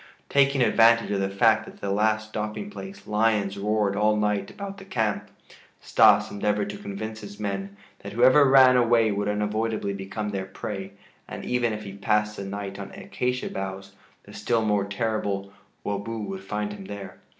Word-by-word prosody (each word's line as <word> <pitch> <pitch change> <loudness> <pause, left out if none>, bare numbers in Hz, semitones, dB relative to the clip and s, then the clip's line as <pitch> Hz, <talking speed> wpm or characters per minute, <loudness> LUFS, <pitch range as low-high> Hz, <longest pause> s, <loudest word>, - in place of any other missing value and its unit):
Taking 140 -1 +4
advantage 115 -1 +4
of 100 - 0
the 95 0 0
fact 110 +2 +3
that - - -12
at - - -21
the 100 - -2
last 110 +1 +1
stopping 110 - -4
place 195 0 -9
lions 105 -2 +1
roared 105 0 0
all 105 +1 +3
night 105 -2 0
about 200 0 -7
the - - -10
camp, 110 - -2 0.5
Stas - - +4
endeavored 105 0 -1
to 105 - -8
convince 110 +2 -6
his 100 -1 -10
men 100 -1 -4 0.2
that 100 - -8
whoever 130 +4 +6
ran 130 -1 +7
away 115 -2 +4
would 100 0 -1
unavoidably 105 0 -1
become 100 +2 -4
their 95 -2 -3
prey, 95 0 -6 0.3
and - - -7
even 125 -2 +1
if 105 0 -5
he 100 -2 -8
passed 105 +1 0
the 100 - -4
night 100 0 -5
on 100 0 -6
acacia 125 0 -3
boughs 95 0 -5 0.3
the - - -14
still 115 -2 0
more 105 -2 +1
terrible 100 -2 -2 0.3
"wobo" 100 +3 -3
would 100 -3 -5
find 105 +1 -3
him 100 -2 -9
there. 100 0 -8
105 Hz, 180 wpm, -25 LUFS, 100-115 Hz, 0.5 s, ran